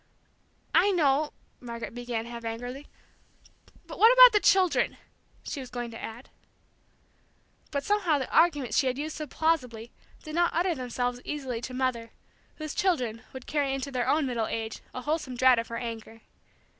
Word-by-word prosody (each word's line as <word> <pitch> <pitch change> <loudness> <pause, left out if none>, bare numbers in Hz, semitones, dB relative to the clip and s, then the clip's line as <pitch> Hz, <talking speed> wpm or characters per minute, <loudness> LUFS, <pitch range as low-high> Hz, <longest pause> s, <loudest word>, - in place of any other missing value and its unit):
"I 405 - +5
know," 300 -5 +2 0.3
Margaret 235 -2 -7
began, 240 -2 -4
half 235 0 -8
angrily; 245 +5 -6 1.0
"but - - -10
what 450 +2 +8
about - - +9
the 415 - +5
children?" 365 -10 +3 0.5
she - - -5
was 260 -2 -8
going 240 -1 -5
to 225 - -9
add. 230 +3 -8 1.4
But 280 -1 -2
somehow 380 -6 +2
the 265 - -4
arguments 295 -9 +3
she 270 - +1
had 255 0 -1
used 305 +2 -4
so 305 - -5
plausibly 250 -8 -1 0.3
did 310 - -8
not 345 +1 +1
utter 350 +2 +2
themselves 245 -2 -3
easily 265 -6 -4
to 255 +1 -6
Mother, 250 -3 -1 0.5
whose 310 -1 -6
children 250 - 0
would 260 -1 -9
carry 280 -3 0
into 270 +1 -4
their 250 -2 -1
own 305 -1 +2
middle 235 -4 -1
age 225 -1 -4
a 255 - -7
wholesome 295 -3 -2
dread 255 -1 +5
of 230 - -4
her 230 - -5
anger. 225 -1 -7
260 Hz, 170 wpm, -28 LUFS, 235-310 Hz, 1.4 s, about